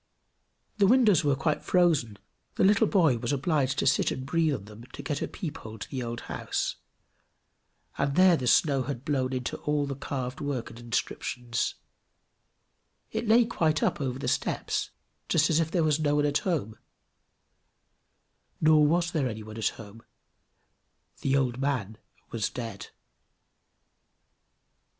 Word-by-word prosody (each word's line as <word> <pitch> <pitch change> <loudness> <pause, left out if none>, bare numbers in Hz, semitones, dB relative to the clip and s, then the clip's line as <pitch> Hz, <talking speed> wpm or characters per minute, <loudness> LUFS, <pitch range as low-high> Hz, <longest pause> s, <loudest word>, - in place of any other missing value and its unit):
The 200 - +5
windows 215 -7 +5
were 145 -2 +2
quite 150 +3 -1
frozen, 160 - +2 0.4
the - - +1
little 210 +3 +5
boy 160 - +3
was 120 +2 -2
obliged 140 -1 0
to - - 0
sit 135 - +3
and 130 - -4
breathe 160 0 +1
on 100 - -8
them 110 +3 -12
to 145 - -8
get 145 0 -3
a - - -1
peep 160 -6 -6
hole 110 - -9
over - - -9
to - - -8
the 130 - -3
old 120 0 -4
house, - - -3 1.2
and 140 0 0
there 185 -1 +6
the 130 -5 -3
snow 140 +1 +4
had 130 0 -5
been 150 - 0
blown 130 -2 0
into 125 -2 -3
all 150 -1 0
the 140 - -4
carved 130 -2 -5
work 140 -5 -3
and 115 - -12
inscriptions; 120 0 -2 1.4
it 230 - -3
lay 230 +2 +6
quite 160 -7 0
up - - 0
over 130 -2 -2
the 135 - -5
steps, - - -1 0.4
just 160 0 +3
as 160 - +3
if 160 -1 0
there 170 -1 +1
was 155 -1 +2
no 145 -1 +1
one 145 0 +2
at 145 0 +2
home 135 - -2 1.8
nor 155 -1 +5
was 170 +3 +2
there 145 -7 0
any 110 -1 -6
one 110 +1 -9
at 110 - +1
home 110 +1 -7 1.2
the 135 0 +2
old 130 -2 0
man 120 -6 -2 0.3
was 110 -2 -1
dead! 115 -5 -6
140 Hz, 165 wpm, -28 LUFS, 120-160 Hz, 1.8 s, there